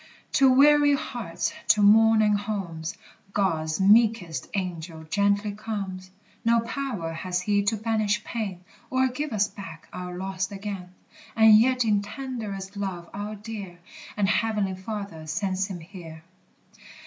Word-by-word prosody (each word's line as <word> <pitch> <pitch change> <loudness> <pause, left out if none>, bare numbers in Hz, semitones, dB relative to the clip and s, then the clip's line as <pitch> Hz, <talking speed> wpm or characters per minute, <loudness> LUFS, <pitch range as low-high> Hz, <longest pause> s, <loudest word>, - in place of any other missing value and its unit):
To 270 -1 +5
weary 290 +2 +6
hearts, 230 - -3
to 210 - +5
mourning 215 0 +6
homes, 195 -6 -3 0.4
God's 160 -5 0
meekest 210 -3 +3
Angel 170 -4 -4
gently 200 +4 +1
comes: 200 -3 -5 0.3
No 230 0 +4
power 230 -9 -4
has 180 +2 -2
he 205 +1 +2
to 215 +2 +1
banish 215 -1 0
pain, 195 -6 -4 0.3
Or 260 0 +2
give 290 +3 -4
us 205 -2 +2
back 165 -7 -10
our 180 0 -6
lost 190 +1 -3
again; 195 -2 -6 0.4
And 220 -1 +8
yet 250 +2 +4
in 205 -2 +3
tenderest 210 -4 -6
love 190 -4 -5
our 205 +1 -5
dear 205 -4 -8 0.4
And 205 -2 +2
heavenly 210 -1 +1
Father 190 -4 -6
sends 185 +4 -1
him 185 -4 -7
here. 165 -3 -11
200 Hz, 135 wpm, -26 LUFS, 185-220 Hz, 0.4 s, And